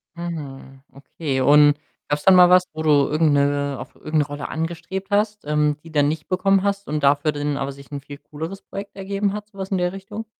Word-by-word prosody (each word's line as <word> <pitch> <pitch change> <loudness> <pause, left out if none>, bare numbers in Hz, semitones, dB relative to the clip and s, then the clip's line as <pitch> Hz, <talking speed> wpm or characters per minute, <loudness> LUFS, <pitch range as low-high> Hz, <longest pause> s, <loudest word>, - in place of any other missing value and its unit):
Mhm. 140 -6 -7
Okay, 140 -1 -4
und 145 +1 +6 0.3
gab's 145 0 -1
dann 190 -1 +7
mal 180 -1 +8
was, 180 0 +6
wo 155 - -5
du 155 - 0 0.2
irgend 155 0 +2
'ne 140 -1 +1
auf - - -10
irgend 155 - -7
'ne 145 - +2
Rolle 145 0 -6
angestrebt 170 +4 -4
hast, 210 -2 0
ähm, 150 0 +1
die 165 - -13
dann 145 -2 +3
nicht 150 0 -3
bekommen 195 +1 +2
hast 200 0 -1
und 150 -1 -2
dafür 145 +2 +3
dann 145 -1 -2
aber 140 0 -3
sich 140 +1 -14
'n 140 - -5
viel 145 +1 -10
cooleres 160 +7 -8
Projekt 200 0 -8
ergeben 200 +1 -2
hat, 210 0 -6
sowas 195 -1 -7
in 190 - 0
der 180 0 0
Richtung? 200 +3 -7
155 Hz, 220 wpm, -22 LUFS, 145-190 Hz, 0.3 s, mal